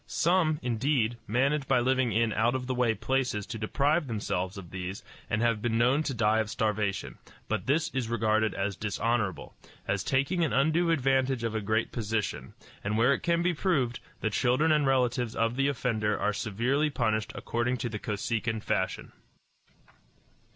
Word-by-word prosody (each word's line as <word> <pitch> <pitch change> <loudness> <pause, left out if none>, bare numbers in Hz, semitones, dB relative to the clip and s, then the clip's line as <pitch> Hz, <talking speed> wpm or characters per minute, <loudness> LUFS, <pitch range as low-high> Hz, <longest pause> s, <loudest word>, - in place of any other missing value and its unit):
Some, 165 -3 +2
indeed, 120 -1 0
manage 135 +5 +1
by 135 -2 +3
living 130 -1 +2
in 115 +1 +1
out 115 +3 +2
of 130 -1 -2
the 130 - -2
way 120 -3 +1
places 115 -2 -1
to 115 -2 -6
deprive 145 +8 +1
themselves 100 -4 -2
of 90 -4 -9
these, 95 +1 -5 0.3
and 105 +2 0
have 115 -2 +1
been 115 -1 0
known 125 +5 +3
to 150 -3 -2
die 110 -1 +2
of 110 -1 -1
starvation; 105 -3 -2 0.3
but 110 -1 -2
this 155 +4 +1
is 130 -3 -2
regarded 110 -1 +1
as 100 0 -1
dishonorable, 105 -4 -2 0.3
as 95 0 0
taking 140 +7 +1
an 145 -9 0
undue 160 +6 +2
advantage 135 -4 +1
of 115 -1 -1
a 110 - -1
great 110 +2 0
position, 110 -2 -3 0.3
and 105 +2 -1
where 120 +5 +4
it - - -1
can 170 0 +1
be 180 0 +2
proved, 145 -9 0 0.2
the 110 - 0
children 130 +8 +2
and 150 -2 +3
relatives 125 -3 +1
of 115 +1 +1
the 135 +1 +2
offender 115 -6 0
are 105 - +1
severely 120 +9 0
punished 110 -6 -1
according 120 +2 -1
to 120 - -3
the 105 -2 -5
Kosekin 110 +2 -2
fashion. - - -2
120 Hz, 175 wpm, -29 LUFS, 110-135 Hz, 0.3 s, where